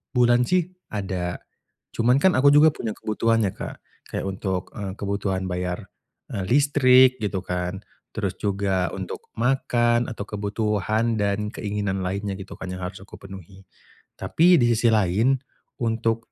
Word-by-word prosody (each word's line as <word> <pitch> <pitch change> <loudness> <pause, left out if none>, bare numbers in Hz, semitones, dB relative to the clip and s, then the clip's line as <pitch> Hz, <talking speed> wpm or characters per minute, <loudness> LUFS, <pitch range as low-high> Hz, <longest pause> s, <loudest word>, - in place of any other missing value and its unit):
bulan 120 0 +4
sih 180 -1 +1 0.2
ada. 95 -4 -3 0.6
Cuman 120 +3 +3
kan 190 - +5
aku 140 +2 +6
juga 150 +2 +7
punya 115 -6 -4
kebutuhan 115 +1 0
ya, 95 - 0
Kak. - - -6 0.3
Kayak - - -3
untuk, 95 -1 -3
eee, 100 -3 -5
kebutuhan 100 -2 -2
bayar, 90 0 -4 0.4
eee, 95 -2 -2
listrik 130 -2 +5
gitu 95 -2 -1
kan, 90 +1 -3 0.3
terus - - -2
juga 95 -3 0
untuk - - -5 0.2
makan 120 -1 +2
atau 105 - -5
kebutuhan 105 +2 -1
dan 105 +1 0
keinginan 100 -2 -2
lainnya 100 +2 -2
gitu 95 - -9
kan 95 - -6
yang 90 - -6
harus 90 +2 -6
aku 100 - -13
penuhi. 95 0 -12 0.5
Tapi 175 +2 +4
di 120 - +4
sisi 115 +1 +2
lain 105 +6 +3 0.5
untuk 115 0 -1
105 Hz, 145 wpm, -24 LUFS, 95-120 Hz, 0.6 s, juga